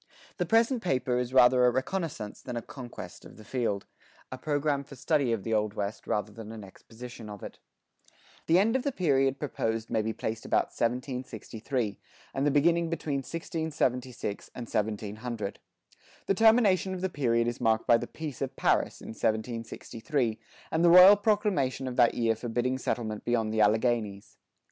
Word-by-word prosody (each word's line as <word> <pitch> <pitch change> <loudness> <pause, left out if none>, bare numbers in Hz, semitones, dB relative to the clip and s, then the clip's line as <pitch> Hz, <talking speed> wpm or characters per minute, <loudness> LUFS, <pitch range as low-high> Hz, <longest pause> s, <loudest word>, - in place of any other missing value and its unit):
The - - -1
present 230 +2 +3
paper 130 - 0
is 125 0 -2
rather 125 -1 +6
a 125 - +6
reconnaissance 130 - -3
than 125 -2 -5
a 115 - -4
conquest 125 -3 -9
of - - -14
the 110 - -12
field, 110 -4 -2 0.5
a 130 - -5
program 145 -1 0
for 140 - -12
study 140 -1 +1
of 110 -4 -1
the 115 - -2
Old 105 -1 0
West 100 +1 -4
rather 105 0 -1
than 110 +1 -9
an 110 -2 -8
exposition 115 +3 -11
of 105 -2 -9
it. - - -9 0.9
The 165 - +5
end 220 +6 +3
of 265 - +2
the 280 - -1
period 135 - +2
proposed 115 -6 -3
may 110 - +2
be 110 +1 -2
placed 110 +1 -4
about - - +1
1763, 125 -2 -3 0.3
and 135 +2 0
the - - +5
beginning 165 +4 +3
between 155 -4 -2
1676 135 - -3
and 120 - -5
1700. 105 0 -3 0.7
The - - +2
termination 205 -3 +4
of 180 - -6
the 190 - +1
period 120 -8 +1
is 120 +1 -3
marked 110 -2 +2
by 120 - +6
the - - -5
Peace 150 -6 -7
of - - -3
Paris - - +1
in - - -9
1763, 115 +2 -2 0.3
and 160 +1 +1
the 175 - +6
royal 180 +4 +10
proclamation 200 - 0
of 125 - -4
that 120 -2 +5
year 115 -1 +2
forbidding 120 +3 -2
settlement 110 -4 -3
beyond 115 -2 0
the 110 - +2
Alleghanies. 105 -2 0
125 Hz, 170 wpm, -29 LUFS, 110-150 Hz, 0.9 s, royal